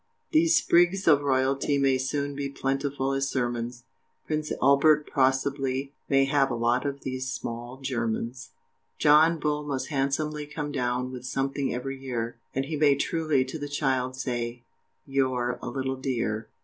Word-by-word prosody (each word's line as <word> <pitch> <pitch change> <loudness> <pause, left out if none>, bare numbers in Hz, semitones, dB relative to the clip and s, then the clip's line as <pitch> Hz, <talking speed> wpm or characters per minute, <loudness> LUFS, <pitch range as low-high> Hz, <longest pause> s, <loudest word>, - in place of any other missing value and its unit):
These 325 0 +4
sprigs 175 +2 +3
of 145 -3 +6
royalty 135 +1 +1
may 135 -1 +3
soon 140 +2 -2
Be 140 0 -3
plentiful 135 0 -1
as 135 0 0
sermons 120 -1 -2 0.4
Prince 155 -1 -2
Albert 145 +3 +4
possibly 135 0 +1 0.2
may 135 -1 +4
have 135 0 +2
A 120 - -1
lot 120 +3 +1
of 140 0 -4
these 130 0 -3
SMALL 120 0 -5
GERMANS! 120 -1 -2 0.5
John 155 +3 +5
Bull 150 0 0
must 140 -3 -3
handsomely 150 +1 -1
come 145 0 -4
down 125 -2 -1
With 125 -1 -7
something 135 +1 -1
every 135 +2 -4
year, 120 -3 -3 0.2
And 135 +1 0
he 155 +2 -3
may 145 -2 +5
truly 150 -2 +1
to 145 +5 -6
the 145 0 -5
child, 130 -3 0
Say, 120 -2 -3 0.4
"You're 130 -3 0
a - - -4
little 130 +1 -2
dear!" 115 -5 -2
135 Hz, 155 wpm, -27 LUFS, 130-145 Hz, 0.5 s, of